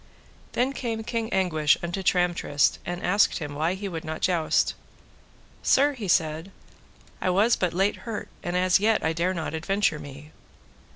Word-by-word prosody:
Then 255 Hz, +3 st, +1 dB
came 225 Hz, -4 st, -3 dB
King 225 Hz, 0 st, -3 dB
Anguish 160 Hz, -6 st, +2 dB
unto 175 Hz, +3 st, -3 dB
Tramtrist, 175 Hz, -6 st, +1 dB
and 175 Hz, 0 st, -4 dB
asked 200 Hz, +3 st, +3 dB
him 150 Hz, -4 st, -5 dB
why 160 Hz, +5 st, 0 dB
he 200 Hz, +1 st, -5 dB
would 165 Hz, -4 st, -5 dB
not 160 Hz, 0 st, -5 dB
joust. 170 Hz, -4 st, +2 dB, 0.9 s
Sir, 285 Hz, +2 st, +3 dB
he 230 Hz, -7 st, -6 dB
said, 165 Hz, +1 st, +1 dB, 0.7 s
I -, -, +1 dB
was 205 Hz, +6 st, +4 dB
but 180 Hz, -2 st, 0 dB
late 195 Hz, +4 st, +1 dB
hurt, 225 Hz, -3 st, -6 dB
and 175 Hz, +1 st, -2 dB
as 185 Hz, 0 st, +4 dB
yet 215 Hz, +1 st, +2 dB
I 160 Hz, -, +1 dB
dare 175 Hz, +3 st, 0 dB
not 165 Hz, -2 st, -4 dB
adventure 160 Hz, 0 st, 0 dB
me. 145 Hz, +2 st, -11 dB
180 Hz, 165 wpm, -26 LUFS, 160-205 Hz, 0.9 s, was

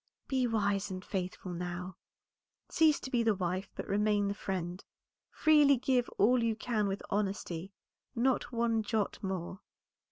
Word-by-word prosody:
"Be 260 Hz, -2 st, +1 dB
wise 205 Hz, -2 st, 0 dB
and 185 Hz, -1 st, -6 dB
faithful 185 Hz, -1 st, -4 dB
now; 180 Hz, +1 st, -5 dB, 0.7 s
cease 315 Hz, -2 st, +4 dB
to 260 Hz, -, -6 dB
be 240 Hz, -, +2 dB
the 225 Hz, -2 st, +2 dB
wife, 185 Hz, +1 st, -2 dB
but -, -, -5 dB
remain 205 Hz, 0 st, +2 dB
the -, -, -1 dB
friend; 185 Hz, -3 st, -4 dB, 0.5 s
freely 295 Hz, -3 st, +5 dB
give 250 Hz, 0 st, +1 dB
all 240 Hz, +3 st, +4 dB
you 225 Hz, -1 st, +1 dB
can 220 Hz, -2 st, -1 dB
with 195 Hz, 0 st, -3 dB
honesty, 195 Hz, -3 st, -2 dB, 0.4 s
not 250 Hz, +2 st, +1 dB
one 230 Hz, -2 st, +1 dB
jot 215 Hz, -1 st, -1 dB
more." 190 Hz, -1 st, -4 dB
205 Hz, 150 wpm, -32 LUFS, 190-235 Hz, 0.7 s, freely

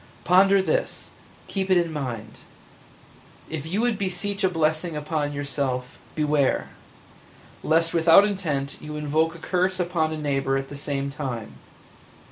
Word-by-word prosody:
Ponder 195 Hz, +2 st, +5 dB
this -, -, -2 dB, 0.2 s
– -, -, -26 dB
keep 195 Hz, -1 st, -2 dB
it 185 Hz, -, +5 dB
in 170 Hz, -2 st, 0 dB
mind. 120 Hz, -7 st, -5 dB, 1.1 s
If 160 Hz, -1 st, -4 dB
you 195 Hz, +7 st, 0 dB
would 235 Hz, -4 st, +1 dB
beseech 195 Hz, +1 st, -2 dB
a 190 Hz, -, +4 dB
blessing 160 Hz, -1 st, 0 dB
upon 150 Hz, -1 st, -2 dB
yourself, 140 Hz, -2 st, -3 dB, 0.2 s
beware! 150 Hz, -3 st, +1 dB, 0.9 s
lest 165 Hz, +1 st, +2 dB
without 165 Hz, +4 st, +7 dB
intent 155 Hz, -9 st, -2 dB
you 150 Hz, 0 st, -7 dB
invoke 155 Hz, +2 st, 0 dB
a -, -, -8 dB
curse 185 Hz, +2 st, 0 dB
upon 170 Hz, -3 st, 0 dB
a 155 Hz, -, -3 dB
neighbor 135 Hz, -2 st, 0 dB
at 135 Hz, 0 st, -4 dB
the 145 Hz, -, -7 dB
same 140 Hz, -1 st, -2 dB
time. 125 Hz, -, -5 dB
155 Hz, 145 wpm, -25 LUFS, 140-180 Hz, 1.1 s, without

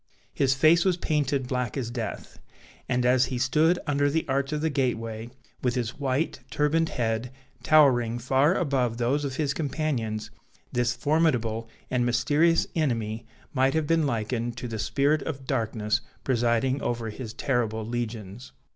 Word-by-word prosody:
His 135 Hz, -1 st, +2 dB
face 160 Hz, +4 st, +5 dB
was 185 Hz, -2 st, +2 dB
painted 145 Hz, -5 st, 0 dB
black 125 Hz, -2 st, -2 dB
as 120 Hz, -3 st, -3 dB
death; 120 Hz, -2 st, -6 dB, 0.5 s
and 125 Hz, -1 st, +1 dB
as 125 Hz, 0 st, +4 dB
he 130 Hz, -, -3 dB
stood 155 Hz, +7 st, +3 dB
under 145 Hz, -1 st, +2 dB
the 160 Hz, +3 st, 0 dB
arch 135 Hz, +1 st, 0 dB
of 150 Hz, -1 st, -1 dB
the 160 Hz, 0 st, 0 dB
gateway, 115 Hz, -4 st, -2 dB, 0.3 s
with 125 Hz, -1 st, 0 dB
his 125 Hz, +1 st, -3 dB
white 140 Hz, +3 st, -1 dB
turbaned 160 Hz, +2 st, +1 dB
head 115 Hz, 0 st, -2 dB, 0.3 s
towering 125 Hz, -7 st, +4 dB
far 135 Hz, +7 st, +2 dB
above 130 Hz, -7 st, 0 dB
those 130 Hz, +5 st, +1 dB
of 135 Hz, -2 st, -3 dB
his 145 Hz, -1 st, 0 dB
companions, 135 Hz, -8 st, -2 dB, 0.4 s
this 120 Hz, 0 st, +1 dB
formidable 120 Hz, -6 st, +1 dB, 0.2 s
and 125 Hz, -1 st, +2 dB
mysterious 145 Hz, +7 st, +3 dB
enemy 115 Hz, -7 st, -1 dB, 0.3 s
might 135 Hz, +1 st, +2 dB
have 160 Hz, -1 st, +1 dB
been 160 Hz, -1 st, +2 dB
likened 115 Hz, 0 st, -2 dB
to 125 Hz, -, -4 dB
the 110 Hz, -2 st, -5 dB
spirit 140 Hz, +8 st, +1 dB
of 135 Hz, -4 st, -5 dB
darkness 110 Hz, -4 st, 0 dB, 0.2 s
presiding 125 Hz, +2 st, +1 dB
over 115 Hz, -2 st, -2 dB
his 115 Hz, 0 st, -7 dB
terrible 115 Hz, -5 st, -1 dB
legions. 115 Hz, -1 st, -5 dB
130 Hz, 155 wpm, -26 LUFS, 115-145 Hz, 0.5 s, face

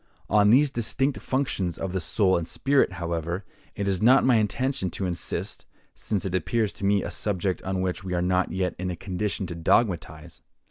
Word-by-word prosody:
On 105 Hz, 0 st, +5 dB
these 135 Hz, +5 st, +5 dB
distinct 135 Hz, +3 st, 0 dB
functions 115 Hz, -10 st, -1 dB
of 95 Hz, -, -3 dB
the 95 Hz, -, -1 dB
soul 95 Hz, +4 st, +2 dB
and 85 Hz, -1 st, -2 dB
spirit, 140 Hz, -7 st, +1 dB
however, 85 Hz, +1 st, -3 dB, 0.3 s
it 100 Hz, -, -2 dB
is 95 Hz, -2 st, 0 dB
not 130 Hz, +5 st, +6 dB
my 125 Hz, -3 st, +5 dB
intention 110 Hz, 0 st, 0 dB
to 95 Hz, -, -4 dB
insist, 85 Hz, -2 st, -4 dB, 0.3 s
since 100 Hz, -4 st, -2 dB
it 95 Hz, -, -3 dB
appears 105 Hz, +5 st, 0 dB
to 100 Hz, -, -5 dB
me 100 Hz, -1 st, +3 dB
a -, -, -4 dB
subject 95 Hz, -2 st, -1 dB
on 95 Hz, 0 st, -2 dB
which 95 Hz, +1 st, -2 dB
we 90 Hz, -1 st, -3 dB
are -, -, +1 dB
not 90 Hz, 0 st, +1 dB
yet 90 Hz, 0 st, -1 dB
in 90 Hz, 0 st, -2 dB
a 90 Hz, -, -3 dB
condition 95 Hz, +3 st, -3 dB
to 85 Hz, -, -5 dB
dogmatize. 85 Hz, -3 st, 0 dB
95 Hz, 195 wpm, -26 LUFS, 90-110 Hz, 0.3 s, not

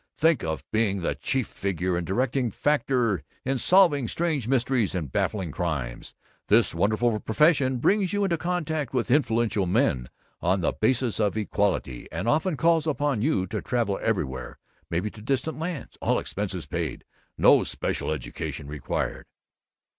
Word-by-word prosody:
Think 160 Hz, -4 st, +3 dB
of 80 Hz, -1 st, -3 dB
being 105 Hz, -3 st, +1 dB
the 85 Hz, -, 0 dB
chief 120 Hz, -, -1 dB
figure 95 Hz, -2 st, -2 dB
and 85 Hz, -1 st, -2 dB
directing 125 Hz, +4 st, 0 dB
factor 125 Hz, -, +1 dB, 0.2 s
in 135 Hz, 0 st, 0 dB
solving 165 Hz, -9 st, +4 dB
strange 155 Hz, -5 st, -1 dB
mysteries 125 Hz, -5 st, +1 dB
and 80 Hz, -7 st, -3 dB
baffling 95 Hz, -7 st, -1 dB
crimes. 75 Hz, -8 st, -4 dB, 0.3 s
This 110 Hz, -1 st, +4 dB
wonderful 110 Hz, +5 st, +1 dB
profession 135 Hz, +2 st, +3 dB
brings 195 Hz, -, +2 dB
you 205 Hz, 0 st, 0 dB
into 185 Hz, -4 st, +2 dB
contact 160 Hz, -5 st, -2 dB
with 120 Hz, 0 st, 0 dB
influential 115 Hz, -7 st, +2 dB
men 90 Hz, -, +1 dB, 0.3 s
on 95 Hz, +2 st, +1 dB
the 85 Hz, -, +1 dB
basis 120 Hz, 0 st, 0 dB
of 105 Hz, 0 st, +1 dB
equality, 100 Hz, -, -1 dB
and 85 Hz, +7 st, -3 dB
often 155 Hz, +4 st, +1 dB
calls 165 Hz, 0 st, +3 dB
upon 145 Hz, -6 st, 0 dB
you 120 Hz, -8 st, +1 dB
to 95 Hz, -, -4 dB
travel 115 Hz, -5 st, -1 dB
everywhere, 70 Hz, -, -2 dB, 0.3 s
maybe 90 Hz, +6 st, -1 dB
to 105 Hz, -, -12 dB
distant 135 Hz, +7 st, -1 dB
lands 165 Hz, -2 st, -5 dB
all -, -, +2 dB
expenses 95 Hz, -4 st, -3 dB
paid. 85 Hz, -7 st, -4 dB, 0.3 s
NO -, -, +6 dB
SPECIAL -, -, -2 dB
EDUCATION 75 Hz, -2 st, -4 dB
REQUIRED." 75 Hz, +1 st, -3 dB
115 Hz, 150 wpm, -26 LUFS, 95-145 Hz, 0.3 s, NO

